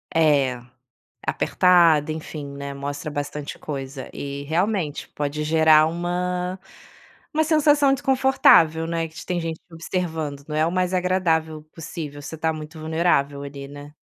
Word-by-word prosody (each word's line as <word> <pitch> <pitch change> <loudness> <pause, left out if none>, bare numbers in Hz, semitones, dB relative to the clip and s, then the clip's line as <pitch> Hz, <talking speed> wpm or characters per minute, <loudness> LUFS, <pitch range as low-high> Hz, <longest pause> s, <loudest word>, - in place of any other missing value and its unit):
É, 140 -6 +3 0.7
apertada 170 -4 +4
enfim, 155 -2 -6
né, 140 0 -5
mostra 145 +2 -5
bastante 145 0 -5
coisa 135 -2 -6
e, 140 0 -6
realmente, 170 -1 -1
pode 150 +1 -3
gerar 155 0 +5
uma 180 +2 -2 0.7
uma 315 +1 +3
sensação 295 -3 +4
desconfortável, 255 - +4
né, 165 0 -1
de 160 - -19
que - - -9
tem 180 -1 -1
gente 165 -1 -4
te 175 - -24
observando, 160 -4 -3
não 150 - -4
é 155 +1 +3
o 165 - -1
mais 185 0 0
agradável 165 -4 +1
possível, 150 -3 -7
você 145 - -8
está 160 0 0
muito 155 +1 -8
vulnerável 155 -3 0
ali, 140 -1 -8
né. 145 +1 -11
160 Hz, 145 wpm, -23 LUFS, 145-175 Hz, 0.7 s, gerar